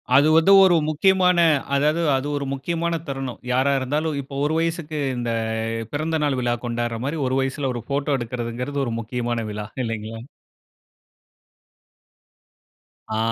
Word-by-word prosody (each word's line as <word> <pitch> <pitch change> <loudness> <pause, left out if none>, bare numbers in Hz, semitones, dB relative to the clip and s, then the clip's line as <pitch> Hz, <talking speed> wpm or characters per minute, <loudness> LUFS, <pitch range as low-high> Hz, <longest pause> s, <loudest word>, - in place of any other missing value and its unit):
அது 145 +3 +6
வந்து 165 +5 +5
ஒரு 185 -2 +5
முக்கியமான 180 +3 +3 0.4
அதாது 150 +4 +2
அது 135 +2 -2
ஒரு 140 - -3
முக்கியமான 165 +4 -2
தருணம். 135 -2 -4
யாரா 130 +2 +3
இருந்தாலும் 150 +3 -1
இப்போ 135 +1 -10
ஒரு 155 - 0
வயசுக்கு 165 -2 -2 0.2
இந்த 120 -1 -2 0.6
பிறந்த 160 +2 -1
நாள் 140 -3 +1
விழா 120 -1 +1
கொண்டாடுற 120 -1 -2
மாரி 150 +3 -2
ஒரு 130 +1 0
வயசுல 135 0 -1
ஒரு 120 - -4
போட்டோ 140 0 0
எடுக்கறதுங்கிறது 125 +4 -3
ஒரு 115 - -3
முக்கியமான 120 0 -3
விழா 105 0 -5 0.2
இல்லைங்களா? 115 0 -5 2.9
ஆ. - - 0
140 Hz, 135 wpm, -23 LUFS, 120-155 Hz, 2.9 s, அது